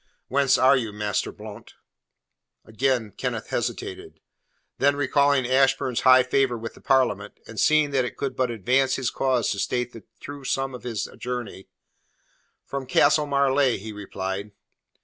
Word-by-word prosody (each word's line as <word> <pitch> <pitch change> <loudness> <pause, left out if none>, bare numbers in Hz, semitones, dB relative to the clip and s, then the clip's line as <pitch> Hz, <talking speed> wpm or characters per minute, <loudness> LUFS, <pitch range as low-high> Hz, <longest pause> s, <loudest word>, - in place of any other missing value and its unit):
"Whence 135 -1 +3
are 130 +2 +5
you, 115 -5 -2
Master 105 -1 -2
Blount?" - - -11 0.9
Again 115 -1 -1
Kenneth - - -4
hesitated. - - -4 0.6
Then 140 +1 +3
recalling 140 -1 +2
Ashburn's 130 -1 +2
high 130 0 +7
favour 125 -1 +1
with 115 0 -7
the - - -17
Parliament, 130 -1 +1
and - - -8
seeing 155 -2 +3
that 135 -2 +2
it 125 - -6
could 135 -2 -3
but 130 -1 0
advance 125 +4 +1
his 130 -2 -2
cause 130 -4 0
to 100 - -3
state 125 +4 -2
the 115 - -10 0.2
true 145 -1 -9
sum 135 0 -2
of 125 - -8
his 115 -5 -4
journey: 120 -6 -5 1.0
"From 140 -2 -5
Castle 150 +3 +3
Marleigh," 140 -2 +2
he 110 +2 -8
replied. 100 0 -5
130 Hz, 150 wpm, -24 LUFS, 115-135 Hz, 1.0 s, high